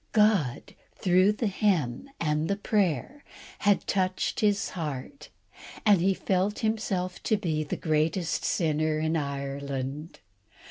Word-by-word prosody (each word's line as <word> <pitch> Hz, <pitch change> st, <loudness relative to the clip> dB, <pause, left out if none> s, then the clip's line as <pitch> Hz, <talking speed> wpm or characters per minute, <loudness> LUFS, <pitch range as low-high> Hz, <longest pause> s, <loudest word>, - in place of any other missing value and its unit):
God, 210 Hz, -, +2 dB, 0.2 s
through 185 Hz, +2 st, +3 dB
the 225 Hz, -, -2 dB
hymn 190 Hz, -, 0 dB
and 155 Hz, 0 st, 0 dB
the 200 Hz, -, +1 dB
prayer, 205 Hz, -, -1 dB, 0.4 s
had 205 Hz, -1 st, +2 dB
touched 185 Hz, -1 st, 0 dB
his 205 Hz, -2 st, +2 dB
heart, 155 Hz, -, -6 dB, 0.6 s
and 205 Hz, -5 st, +5 dB
he 190 Hz, +2 st, +3 dB
felt 195 Hz, +3 st, 0 dB
himself 195 Hz, -5 st, -1 dB
to 215 Hz, -, +1 dB
be 160 Hz, -6 st, -1 dB
the 145 Hz, -, -4 dB
greatest 160 Hz, +2 st, 0 dB
sinner 155 Hz, -2 st, +1 dB
in 160 Hz, +1 st, 0 dB
Ireland. 140 Hz, 0 st, -4 dB
180 Hz, 125 wpm, -28 LUFS, 150-205 Hz, 0.6 s, and